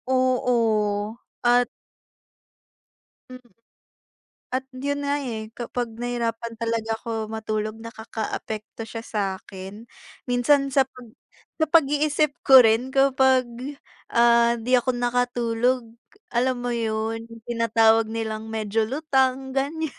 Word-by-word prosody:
Oo 230 -5 +1 0.3
at 245 0 +4 1.6
Mm. 255 -1 -13 1.0
At 260 +1 -1
yun 285 +2 -2
nga, 285 - +1
eh, 220 -4 -5
kapag 240 -1 -4
nahirapan 235 -1 -3
talaga 230 -1 -1
ko 225 -2 -3
matulog 215 -1 -3
nakakaapekto 220 -1 -6
siya 225 - -6
sa'kin 195 +1 -5 0.4
minsan 265 +3 +3
sa 270 - +5
pag 255 -2 -14 0.5
sa - - +5
pag-iisip 295 -1 +3
ko 265 - +9
rin 225 +4 +2
kapag, 265 -1 +4 0.7
ah, 235 0 +4
di 245 +3 -2
ako 250 +1 +2
nakatulog 245 -1 0 0.4
alam 255 +2 +2
mo 245 - -1
yun 225 0 -2
yung 230 -1 -12
tinatawag 225 -1 +3
nilang 220 -1 -4
medyo 220 0 0
lutang, 265 -1 0
ganyan. 295 +3 -1
235 Hz, 110 wpm, -24 LUFS, 225-255 Hz, 1.6 s, ko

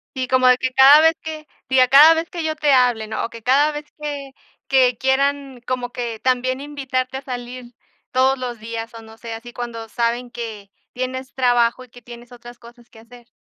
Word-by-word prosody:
Sí, 260 -1 -3
como 255 0 +3
de 250 - +6
que 255 0 -3
cada 275 +3 +8
vez 320 0 +5
que, 310 -1 -7 0.2
diga, 255 -1 +4
cada 295 +5 +8
vez 325 +1 -3
que 345 -3 -5
yo 315 0 -3
te 295 -2 +2
hable, 245 -4 +2
¿no?, 220 - -4
o - - -3
que 230 -1 -12
cada 280 +5 +3
vez 295 0 -7
que 285 -2 -6 0.3
que 255 -3 +3
quieran, 275 0 -1
como 250 -1 -3
que 235 -3 -5
también 255 +1 -1
invitarte 265 -3 -4
a - - -7
salir 245 -1 -8 0.4
todos 265 +1 +2
los 245 -2 -5
días 230 +1 -7
o 230 - -10
no 220 0 -15
sé, 230 0 -8
así, 230 +2 -9
cuando 235 -2 -7
saben 235 +2 -2
que 220 -4 -8 0.2
tienes 255 +1 -5
trabajo 245 -1 +1
y - - -27
que 245 +1 -16
tienes 240 +1 -13
otras 240 0 -13
cosas 235 0 -17
que 220 - -17
hacer. 240 +1 -17
255 Hz, 210 wpm, -20 LUFS, 240-270 Hz, 0.4 s, cada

